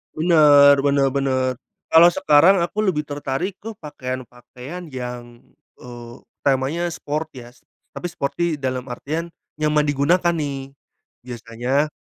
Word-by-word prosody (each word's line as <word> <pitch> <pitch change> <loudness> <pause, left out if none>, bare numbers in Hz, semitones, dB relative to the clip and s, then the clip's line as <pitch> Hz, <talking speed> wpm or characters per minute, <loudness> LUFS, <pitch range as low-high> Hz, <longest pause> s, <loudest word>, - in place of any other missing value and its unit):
Bener, 150 -4 +6
bener 140 -1 +2
bener, 130 -2 0 0.4
kalau 170 +2 +7
sekarang 175 +4 +4
aku 205 +5 -1
lebih 150 -7 -1
tertarik 145 +6 -4
ke 225 - -5
pakaian-pakaian 130 +3 -8
yang, 125 -1 -6 0.6
eee, 120 -1 -11 0.3
temanya 145 +6 0
sport 155 +1 -4
ya 125 -2 -11
s - - -27 0.3
tapi 175 - -4
sporty 170 +1 -3 0.2
dalam 130 -1 -3
artian, 160 +7 -5 0.2
nyaman 150 0 +1
digunakan 170 +5 +2
nih, 140 -3 -5 0.5
biasanya 125 +4 -2
145 Hz, 120 wpm, -21 LUFS, 130-160 Hz, 0.6 s, kalau